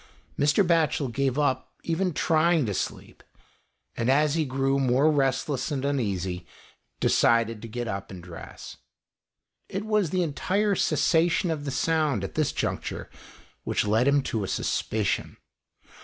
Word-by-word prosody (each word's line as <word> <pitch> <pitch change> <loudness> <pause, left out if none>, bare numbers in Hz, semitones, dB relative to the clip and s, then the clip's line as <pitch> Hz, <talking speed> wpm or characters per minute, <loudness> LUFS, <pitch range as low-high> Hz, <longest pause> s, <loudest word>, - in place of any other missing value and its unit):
Mr. 145 +7 +3
Batchel 160 -5 +2
gave 135 0 0
up 130 -3 0
even 180 +2 0
trying 160 -1 +2
to 105 - -2
sleep, - - -5 0.7
and 115 +2 -1
as 145 +2 +3
he 160 -1 +1
grew 135 +1 0
more 135 +4 +3
restless 135 -1 0
and 140 -3 -2
uneasy, 95 -10 -2 0.5
decided 115 -2 +2
to 115 - -7
get 120 +2 -4
up 95 -2 -4
and 90 -3 -9
dress. 85 -2 -10 0.9
It 195 +3 -4
was 210 -5 +1
the 185 +2 +1
entire 195 +7 0
cessation 170 -1 +2
of 150 -2 -3
the - - -2
sound 150 - +1
at 95 - -5
this 155 -2 +1
juncture - - -3 0.5
which - - 0
led 110 +5 +2
him 140 0 +3
to 110 -5 -2
a - - -3
suspicion. 105 +2 -1
140 Hz, 145 wpm, -26 LUFS, 115-160 Hz, 0.9 s, Mr